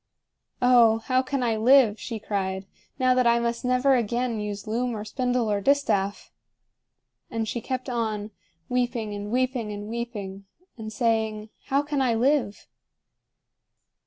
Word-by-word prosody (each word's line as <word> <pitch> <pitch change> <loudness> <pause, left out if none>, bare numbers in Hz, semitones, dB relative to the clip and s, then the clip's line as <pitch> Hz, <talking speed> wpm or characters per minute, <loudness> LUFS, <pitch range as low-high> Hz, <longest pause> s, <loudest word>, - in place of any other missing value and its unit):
"Oh, 240 -3 +6
how 255 0 +2
can 265 0 -2
I 230 -2 +1
live," 230 -2 +5
she 230 - -5
cried, 190 -2 -3 0.3
"now 255 -2 +3
that 250 -1 +3
I 235 0 +5
must 235 +1 -2
never 255 +2 +3
again 235 0 -1
use 205 -1 -5
loom 235 +2 -1
or 210 - -6
spindle 245 -1 0
or 200 -1 0
distaff?" 210 -6 +1 1.0
And 225 -2 -2
she 235 - -3
kept 255 +2 -4
on, 220 -4 -2 0.4
weeping 240 -4 -1
and 205 0 -5
weeping 250 -3 0
and 205 0 -6
weeping, 210 -4 -5 0.3
and 220 -2 -7
saying, 220 -1 0 0.2
"How 275 +2 +1
can 290 -1 -1
I 245 -3 +2
live?" 250 -3 +1
235 Hz, 145 wpm, -25 LUFS, 210-255 Hz, 1.0 s, Oh